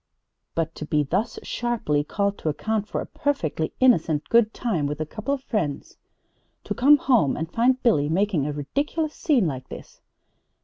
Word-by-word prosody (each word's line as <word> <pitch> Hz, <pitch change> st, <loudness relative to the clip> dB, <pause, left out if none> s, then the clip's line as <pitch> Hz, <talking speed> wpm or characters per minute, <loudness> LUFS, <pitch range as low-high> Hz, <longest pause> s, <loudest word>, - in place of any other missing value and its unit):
But 165 Hz, -1 st, -1 dB
to 150 Hz, -, -5 dB
be 150 Hz, -1 st, +2 dB
thus 195 Hz, +10 st, -1 dB
sharply 225 Hz, -12 st, -1 dB
called 200 Hz, +5 st, -1 dB
to 155 Hz, -, -1 dB
account 215 Hz, +7 st, -2 dB
for -, -, -3 dB
a -, -, -5 dB
perfectly 170 Hz, -, -2 dB
innocent 165 Hz, -, +3 dB
good 230 Hz, -2 st, +4 dB
time 185 Hz, -, -1 dB
with 145 Hz, +1 st, -4 dB
a 155 Hz, -, -1 dB
couple 215 Hz, -, -5 dB
of 275 Hz, -2 st, -2 dB
friends! 175 Hz, -, -3 dB, 0.7 s
To -, -, -3 dB
come 285 Hz, +4 st, +6 dB
home 240 Hz, -, +2 dB
and 160 Hz, +1 st, -4 dB
find 250 Hz, +3 st, +3 dB
Billy 150 Hz, -, +3 dB
making 175 Hz, -4 st, +1 dB
a -, -, -1 dB
ridiculous 295 Hz, -, -2 dB
scene 275 Hz, -, +2 dB
like 130 Hz, -5 st, -4 dB
this -, -, -11 dB
200 Hz, 175 wpm, -24 LUFS, 150-245 Hz, 0.7 s, come